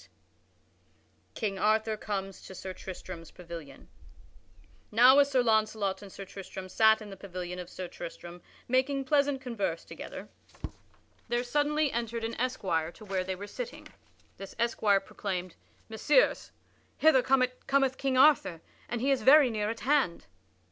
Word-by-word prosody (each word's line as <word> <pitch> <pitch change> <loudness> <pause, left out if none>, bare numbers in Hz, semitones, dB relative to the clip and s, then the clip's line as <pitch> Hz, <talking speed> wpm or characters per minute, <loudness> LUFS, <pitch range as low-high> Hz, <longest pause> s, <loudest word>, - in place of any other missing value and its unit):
[Sidenote: - - -24 1.2
King 200 -3 -2
Arthur 215 +2 +2
comes 195 -2 -5
to 190 - -11
Sir 185 +1 -6
Tristram's 180 -3 -9
pavilion] 165 - -10 1.0
Now, 250 +5 +7
as 280 0 +4
Sir 255 -3 +2
Launcelot 215 -4 +1
and 200 -2 -11
Sir 195 - -8
Tristram 190 -1 -9
sat 220 +2 +4
in 205 - -10
the - - -7
pavilion 180 -2 -6
of 180 -1 -7
Sir 185 -1 -6
Tristram 175 0 -9 0.3
making 265 +2 +1
pleasant 280 -1 +2
converse 205 - -3
together, - - -9 1.0
there 240 +1 0
suddenly 295 +3 +1
entered 230 0 -3
an 225 +1 -2
esquire 180 -10 -1
to 215 - -13
where 190 -2 -1
they 190 0 -3
were 200 +2 -7
sitting. 485 - -7 0.5
This 195 -1 -9
esquire 215 -4 +2
proclaimed: 185 -3 -5 0.3
"Messires, 230 - +2 0.5
hither 315 -5 +5
cometh 265 +1 +1
King 270 -2 0
Arthur, 265 - +4 0.3
and 235 0 -3
he 275 +2 +2
is 270 - +2
very 280 -2 +7
near 210 -1 -1
at 230 - -5
hand." 270 -10 +1
220 Hz, 150 wpm, -29 LUFS, 190-260 Hz, 1.2 s, Now